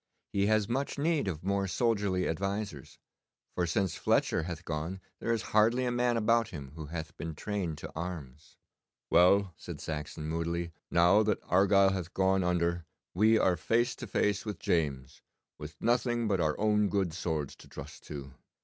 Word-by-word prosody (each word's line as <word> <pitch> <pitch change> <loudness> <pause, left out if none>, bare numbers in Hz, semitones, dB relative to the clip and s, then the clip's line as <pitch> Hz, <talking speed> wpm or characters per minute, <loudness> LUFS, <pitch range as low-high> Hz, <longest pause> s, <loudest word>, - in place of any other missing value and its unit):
He 100 0 +2
has 110 -1 +2
much 135 +6 -2
need 150 -4 +1
of 85 -4 -3
more 100 +1 0
soldierly 100 -2 +1
advisers, 100 -3 -3 0.6
for 90 -1 0
since 90 +1 0
Fletcher - - +1
hath 85 +1 -6
gone 80 +4 -3 0.2
there 115 - -1
is 115 -1 0
hardly 115 +4 +4
a 125 - 0
man 120 0 +1
about 115 +1 +3
him 70 -8 -8
who 80 -1 -7
hath 80 0 -6
been 80 -1 -5
trained 90 -3 -3
to - - -8
arms.' 80 -4 -7 0.5
'Well,' 95 +1 +5
said - - -8
Saxon 75 0 -5
moodily, 85 +1 -2 0.2
'now 90 +5 +5
that 105 -2 +1
Argyle 95 +1 +4
hath 90 -3 -5
gone 95 0 +3
under 85 -1 0 0.3
we 110 +4 +4
are 95 -4 +3
face 120 +9 +1
to 120 - -7
face 105 +1 +1
with 105 -4 -5
James, 70 -6 -1 0.4
with 75 +1 -9
nothing 120 -1 +1
but 95 -4 +1
our 75 -2 0
own 105 -1 +3
good 95 -5 0
swords 80 -5 -3
to - - -15
trust - - -10
to. 70 -3 -7
95 Hz, 170 wpm, -30 LUFS, 80-105 Hz, 0.6 s, Well